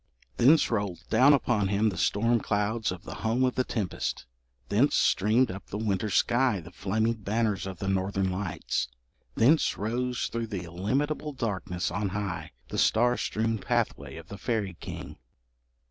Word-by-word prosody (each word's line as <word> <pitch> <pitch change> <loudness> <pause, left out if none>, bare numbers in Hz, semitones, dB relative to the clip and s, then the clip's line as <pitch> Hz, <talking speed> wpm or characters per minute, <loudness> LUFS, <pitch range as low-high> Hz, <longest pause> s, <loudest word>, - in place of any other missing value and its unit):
Thence 145 +4 +5
rolled 100 -6 -2
down 130 +6 +6
upon 120 -7 +2
him 105 +2 +2
the 95 - -5
storm 115 +3 +2
clouds 105 +2 -1
from 90 -2 -5
the - - -7
home 115 +3 +1
of 130 -1 +2
the 130 - +1
tempest; 105 -8 -3 0.4
thence - - +3
streamed 110 +4 +3
up 95 +1 -9
the 105 - -5
winter 105 -1 -1
sky 120 0 +2
the 85 +1 -11
flaming 110 +6 0
banners 105 -2 -1
of 95 -2 -6
the 95 - -4
Northern 95 0 0
lights; 95 -1 -2 0.5
thence 145 +8 +4
rose 125 +4 -1
through 115 -1 -3
the 100 -5 -4
illimitable 135 - -2
darkness 100 -8 -2
on 100 0 -1
high, 100 -2 -4 0.2
the - - -2
star 120 +2 +4
strewn 110 -1 -1
pathway - - -1
of 80 0 -11
the 100 - -8
fairy 105 -7 -1
king. - - -8
105 Hz, 160 wpm, -28 LUFS, 95-120 Hz, 0.5 s, down